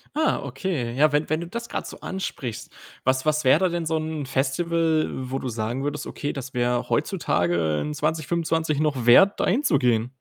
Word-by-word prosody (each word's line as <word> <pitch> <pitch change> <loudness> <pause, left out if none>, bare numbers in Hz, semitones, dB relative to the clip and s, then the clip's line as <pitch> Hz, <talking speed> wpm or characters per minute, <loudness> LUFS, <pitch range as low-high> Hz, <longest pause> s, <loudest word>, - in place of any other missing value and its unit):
Ah, 315 +1 +1
okay. 135 -2 -3
Ja, 150 +3 +4
wenn 150 +1 +1
wenn 155 +1 0
du 170 - -5
das 235 +5 -6
grad - - -4
so - - -10
ansprichst. 125 - -5 0.3
Was 130 +2 +1
was 155 -1 +1
wäre 130 +3 +6
da 190 - +3
denn 170 -1 -2
so 160 0 0
'n 155 -1 -3
Festival, 160 +4 +1
wo 130 +1 -4
du 130 - -4
sagen 115 +3 -3
würdest: 145 0 -3
„Okay, 145 - -4
das 135 -1 -7
wäre 120 0 0
heutzutage 85 -3 0
in 150 - -3
2025 160 0 0
noch 140 -6 0
wert, 195 +12 +7
da - - +2
hinzugehen?“ 135 - +2
145 Hz, 190 wpm, -24 LUFS, 125-160 Hz, 0.3 s, wert